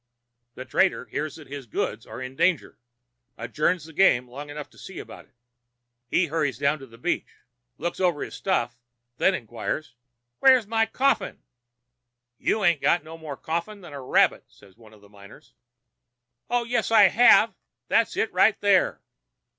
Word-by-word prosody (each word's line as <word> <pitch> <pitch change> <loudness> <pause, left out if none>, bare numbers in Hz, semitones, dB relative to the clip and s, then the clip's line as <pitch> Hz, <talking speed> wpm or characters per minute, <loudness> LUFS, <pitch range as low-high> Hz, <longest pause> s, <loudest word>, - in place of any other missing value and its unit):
The 130 - -8
trader, 190 +8 +1
hearing 155 +1 -4
that 155 - -12
his 140 -2 -9
goods - - -3
are - - -8
in 130 +1 -8
danger, 170 +1 0 0.6
adjourns 150 +8 -1
the 160 - -13
game 135 -8 +3
long 140 +4 -9
enough 145 0 -7
to - - -19
see - - -10
about - - -10
it. - - -38 0.7
He 175 +8 +2
hurries 150 -6 -1
down 140 +2 +1
to 135 - -11
the 115 -1 -16
beach, 175 +9 -3 0.4
looks 175 - -4
over 175 -5 +1
his - - -8
stuff, 120 -11 -1 0.4
then 190 - +3
inquires: 120 - -5 0.5
"'Where's 260 -4 +5
my 225 +1 +1
coffin?' 270 +4 0 1.0
"'You 215 - 0
'ain't 170 -5 +3
got 175 - +2
no 160 +1 -10
more 155 -4 -8
coffin 170 +6 -4
than 170 -5 -12
a 140 - -7
rabbit,' 130 - +2
says 100 -2 -21
one 110 -1 -18
of 105 - -21
the 100 - -18
miners. 100 0 -16 1.0
"'Oh, 245 0 +1
yes, 235 -1 -1
I 225 -2 +7
have. 210 +6 +6 0.3
That's - - +1
it - - -1
right 220 - +4
there.' 200 -2 +2
155 Hz, 170 wpm, -25 LUFS, 130-190 Hz, 1.0 s, I